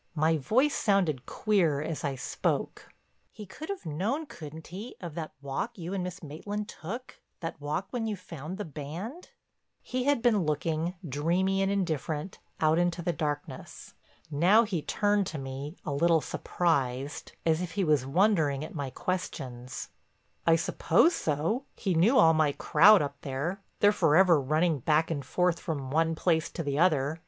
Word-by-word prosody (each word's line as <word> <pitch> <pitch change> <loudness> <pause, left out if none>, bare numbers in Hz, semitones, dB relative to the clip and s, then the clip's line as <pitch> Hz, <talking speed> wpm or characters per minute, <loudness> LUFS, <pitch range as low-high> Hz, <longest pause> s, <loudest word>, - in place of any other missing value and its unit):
My 160 +1 +3
voice 245 - +2
sounded 180 - +1
queer 180 -9 +1
as 155 +1 -4
I 140 -2 -1
spoke: 125 - -2 0.4
"He 210 - -9
could 300 - -9
have 395 -1 -5
known, 205 - -1
couldn't 160 - -10
he, 215 +7 -7
of 175 -5 -7
that 160 -1 -5
walk 170 - -3
you 175 +1 -5
and 190 -2 -1
Miss 180 +1 -6
Maitland 205 +8 -5
took, 225 +9 -8 0.2
that 165 -3 -5
walk 150 +7 -3
when 230 -2 -2
you 215 - -1
found 170 -1 -8
the 210 - -4
band?" 165 - -7 0.5
He 255 0 -2
had 285 -5 +2
been 220 -6 +4
looking, 160 +3 -1
dreamy 175 +7 +1
and 195 0 +1
indifferent, 160 -3 -2 0.2
out 155 +1 +3
into 175 0 0
the 175 0 0
darkness. 145 -3 -5 0.4
Now 180 +10 +5
he 195 -8 -2
turned 205 +3 +1
to 155 - -5
me, 135 +4 -6
a 155 - -2
little 165 +3 +4
surprised, 140 -6 -1
as 160 0 +2
if 180 - -4
he 200 - 0
was 150 -5 +3
wondering 155 -2 +2
at - - -10
my 140 -4 -3
questions: 130 -8 -4 0.6
"I 165 - +7
suppose 170 - +3
so. 165 - -1
He 190 -4 -1
knew 195 +11 +4
all 165 0 +7
my 155 -2 +2
crowd 185 +6 +6
up 140 0 -6
there; 145 +9 -3 0.2
they're 205 - +7
forever 170 -3 +5
running 155 +3 +1
back 155 +5 +2
and 145 -3 -2
forth 180 +5 +1
from 140 -6 -4
one 165 +2 +2
place 160 -1 +1
to 165 - -3
the 140 0 -1
other. 155 -3 +2
165 Hz, 170 wpm, -29 LUFS, 150-195 Hz, 0.6 s, I